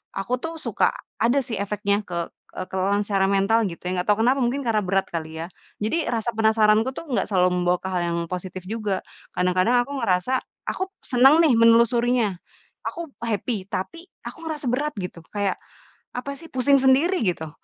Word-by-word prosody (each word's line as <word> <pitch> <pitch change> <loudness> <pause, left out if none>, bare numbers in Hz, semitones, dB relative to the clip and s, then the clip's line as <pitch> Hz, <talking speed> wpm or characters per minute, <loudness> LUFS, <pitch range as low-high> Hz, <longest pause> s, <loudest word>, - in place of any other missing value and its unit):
aku 240 +6 -1
tuh 325 +3 -5
suka - - +1 0.3
ada 240 +5 +3
sih 230 -3 -4
efeknya 200 0 0
ke 170 -2 -3 0.3
eee, 185 - -5
kelelahan 195 +2 +1
secara 195 -2 +1
mental, 200 +3 +3
gitu 170 - -8
ya, - - -1
enggak 180 - -3
tahu 210 +1 +3
kenapa, 260 +3 +3
mungkin 260 +4 -1
karena 230 -3 +1
berat 195 +1 0
kali 160 -1 -5
ya. 165 - -4 0.4
Jadi 310 +9 +1
rasa 235 0 -1
penasaranku 220 +2 +3
tuh 325 -4 -8
enggak 245 - +1
selalu 185 -3 +3
membawa 180 0 +2
ke 190 - -4
hal 180 -1 0
yang 170 0 -1
positif 185 0 -5
juga. 210 -4 -2 0.3
Kadang-kadang 185 +6 +2
aku 275 - -11
ngerasa, 230 +3 +1 0.3
aku 375 - -2 0.2
seneng 270 +6 +5
nih 275 -8 +4
menelusurinya, 235 -2 +4 0.5
aku 335 -3 -5
happy, 215 -2 -2
tapi 335 - -5 0.2
aku - - -7
ngerasa 305 -3 -4
berat, 290 +4 -1
gitu. 180 -1 -6
Kayak, 200 -2 0 0.6
apa 250 +3 -4
sih 330 - -11
pusing 275 +2 +4
sendiri, 275 +6 +3
gitu. 160 -3 -1
220 Hz, 180 wpm, -24 LUFS, 190-255 Hz, 0.6 s, seneng